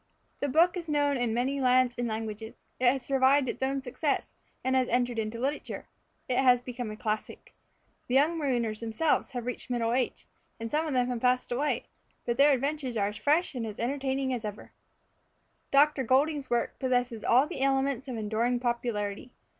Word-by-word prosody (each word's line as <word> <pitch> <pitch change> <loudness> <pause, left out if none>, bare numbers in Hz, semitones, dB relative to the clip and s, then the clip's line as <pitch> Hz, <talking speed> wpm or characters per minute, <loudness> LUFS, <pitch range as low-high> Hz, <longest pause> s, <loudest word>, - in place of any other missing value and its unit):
The 285 - -1
book 335 +6 +4
is 340 -3 -5
known 290 -1 +2
in 245 -3 0
many 255 +5 0
lands 255 -1 +3
and 240 0 -2
languages. 220 0 -6
It 245 -1 +5
has 265 -1 -3
survived 270 +1 +3
its - - -4
own 270 0 -1
success, 280 +3 -2 0.3
and 260 0 +1
has 260 -1 +3
entered 245 -1 0
into 220 +1 -3
literature. 275 +4 -3 0.4
It 250 - +1
has 250 -2 +5
become 245 -2 -6
a 215 - -7
classic. 215 -2 -4 0.5
The 250 - 0
young 300 +5 +4
marooners 240 -7 -1
themselves 230 +7 0
have 245 -2 -4
reached 250 +1 -5
middle 235 -2 0
age, 255 0 -1 0.3
and 230 0 -5
some 310 +2 0
of 300 - -2
them 250 -1 +2
have 245 -2 -3
passed 250 0 +1
away, 280 +5 0 0.4
but 235 0 -1
their 285 +2 +6
adventures 275 -2 -2
are 200 -1 +1
as 210 - -7
fresh 310 +5 +2
and 245 -3 -3
as 210 - -7
entertaining 265 +1 -1
as 240 -2 -3
ever. 210 -1 -7 1.0
Dr. 285 0 +4
Goulding's 280 +3 +1
work 240 -1 -1
possesses 245 -4 0
all 255 +4 +5
the 300 - -6
elements 270 -1 +1
of 250 -3 -4
enduring 225 +3 0
popularity. 235 -2 -3
250 Hz, 185 wpm, -29 LUFS, 235-275 Hz, 1.0 s, their